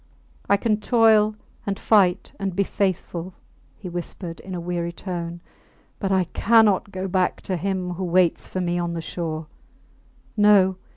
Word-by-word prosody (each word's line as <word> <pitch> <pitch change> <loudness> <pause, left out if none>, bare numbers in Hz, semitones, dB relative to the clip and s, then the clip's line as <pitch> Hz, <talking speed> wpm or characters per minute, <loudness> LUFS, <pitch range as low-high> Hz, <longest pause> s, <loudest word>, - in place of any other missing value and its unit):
I 200 - +5
can 215 0 +1
toil, 215 -1 +4 0.3
and 200 -1 -2
fight 195 -4 +3
and 195 -2 -3
be 200 - +2
faithful, 185 -2 -2 0.4
he 195 - -8
whispered, 175 0 -6
in 190 -1 -7
a - - -3
weary 170 0 -3
tone, 170 -1 -5 0.6
but 195 -2 -1
I 190 -1 +3
cannot 205 +1 +3
go 190 0 -4
back 185 -1 0
to 185 - -2
him 185 0 -2
who 180 +2 -4
waits 180 0 +2
for 185 - -3
me 175 0 -1
on 170 -1 -2
the 165 - -3
shore. 160 -1 -4 0.9
No! 205 -3 +5
185 Hz, 160 wpm, -23 LUFS, 175-200 Hz, 0.9 s, I